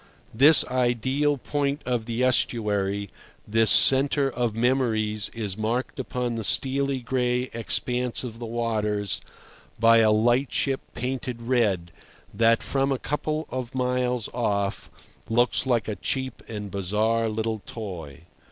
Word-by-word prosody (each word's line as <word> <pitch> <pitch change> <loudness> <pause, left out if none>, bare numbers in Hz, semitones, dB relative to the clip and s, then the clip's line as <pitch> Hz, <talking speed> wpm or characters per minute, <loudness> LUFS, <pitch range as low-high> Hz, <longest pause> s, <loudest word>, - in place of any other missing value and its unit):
This 145 +7 +7
ideal 130 +4 0
point 140 +2 -2
of 120 -2 -2
the 120 +2 -1
estuary, 100 -5 0 0.4
this 110 +1 +3
centre 135 +1 +5
of 120 -3 -2
memories, 115 -4 0
is 105 -5 -4
marked 115 +4 -2
upon 125 -1 -3
the 115 -1 -4
steely 135 +3 +1
gray 125 +1 -1
expanse 125 +2 -1
of 115 -2 -7
the 120 - -6
waters 105 -3 -1 0.6
by 115 0 +6
a 110 -1 +5
lightship 125 +4 +1
painted 125 -1 -4
red 105 -9 0 0.4
that, 115 +2 +3
from 135 0 0
a 135 - +1
couple 155 +3 -3
of 130 0 -5
miles 125 -2 0
off, 100 -5 -1 0.4
looks 120 +3 +2
like 120 -5 +1
a 105 - -2
cheap 130 +6 -3
and 105 -3 -6
bizarre 110 +4 0
little 110 0 -2
toy. 90 - -7
120 Hz, 130 wpm, -25 LUFS, 110-130 Hz, 0.6 s, This